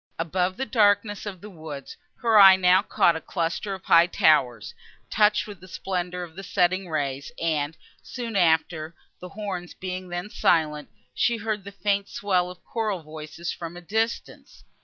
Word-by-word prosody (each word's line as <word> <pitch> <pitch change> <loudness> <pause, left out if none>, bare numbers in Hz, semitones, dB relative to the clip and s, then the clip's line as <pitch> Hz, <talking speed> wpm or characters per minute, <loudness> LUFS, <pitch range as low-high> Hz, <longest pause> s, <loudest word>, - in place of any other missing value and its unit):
Above 180 +3 -1
the 265 - -2
darkness 205 -3 +2
of 190 -4 -7
the 210 - -9
woods, 155 -5 -9 0.3
her 225 -2 +5
eye 195 -1 +10
now 185 0 +4
caught 170 -4 +2
a 160 - -4
cluster 180 +4 -3
of 190 - -13
high 170 +1 +6
towers, 135 - +2 0.4
touched 210 0 +3
with 205 -3 -10
the 185 - -14
splendour 180 -1 -4
of 165 -2 -11
the 195 - -7
setting 185 0 0
rays; 140 -3 -3
and, 160 -2 -1 0.2
soon 235 -3 -6
after, 160 -2 +1 0.2
the 180 - -9
horns 195 -4 -6
being 185 0 -6
then 175 +3 -4
silent, 155 -7 +1 0.2
she 235 -1 +1
heard 215 -2 -3
the 200 - -9
faint 200 0 -1
swell 185 -3 0
of 180 0 -12
choral 215 -7 -2
voices 155 +2 -7
from 170 0 -8
a - - -9
distance. 220 +6 -3
180 Hz, 170 wpm, -25 LUFS, 165-205 Hz, 0.4 s, eye